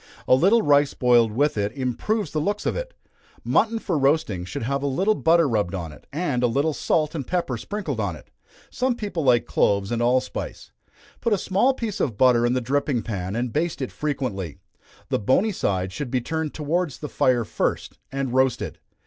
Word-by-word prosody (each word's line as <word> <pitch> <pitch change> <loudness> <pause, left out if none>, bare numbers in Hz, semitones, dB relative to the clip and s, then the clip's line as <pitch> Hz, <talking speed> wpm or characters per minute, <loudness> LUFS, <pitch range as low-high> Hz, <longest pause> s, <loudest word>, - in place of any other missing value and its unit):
A - - +5
little 195 - +5
rice 145 -1 +3
boiled 120 -3 +4
with 140 0 +1
it, 100 0 0
improves 145 - -2
the 155 - -1
looks 205 +6 -2
of - - 0
it. - - -5 0.5
Mutton 225 0 +2
for 180 -8 -1
roasting, 135 - +1
should 95 - -5
have 140 +4 -1
a 140 - -1
little 190 +11 +2
butter 165 -4 +3
rubbed 105 -6 0
on 85 -4 -5
it, 75 - -16
and 145 -5 -1
a 125 - +4
little 140 +6 +1
salt 155 +1 0
and 140 -6 -4
pepper 170 -8 -1
sprinkled 155 - -4
on 100 -5 -1
it - - -16 0.4
some 255 0 0
people 205 -8 -3
like 125 -3 +4
cloves 100 0 +1
and 120 0 0
allspice. 125 +2 -1 0.5
Put 235 -2 +1
a - - +3
small 200 +9 +2
piece 220 -6 -4
of 115 -7 -1
butter 120 -1 +4
in 120 - +1
the 130 - 0
dripping 135 -1 0
pan, 95 -3 -4
and 120 0 -2
baste 165 +1 -1
it 130 - -3
frequently. 120 - -3 0.5
The - - +1
bony 155 - +2
side 95 - -1
should 140 +4 -4
be 130 - +1
turned 160 +4 -3
towards 155 0 -1
the 150 - -6
fire 125 -4 +2
first, - - -2
and 135 -2 -2
roasted. 130 -1 +1
135 Hz, 200 wpm, -24 LUFS, 120-170 Hz, 0.5 s, A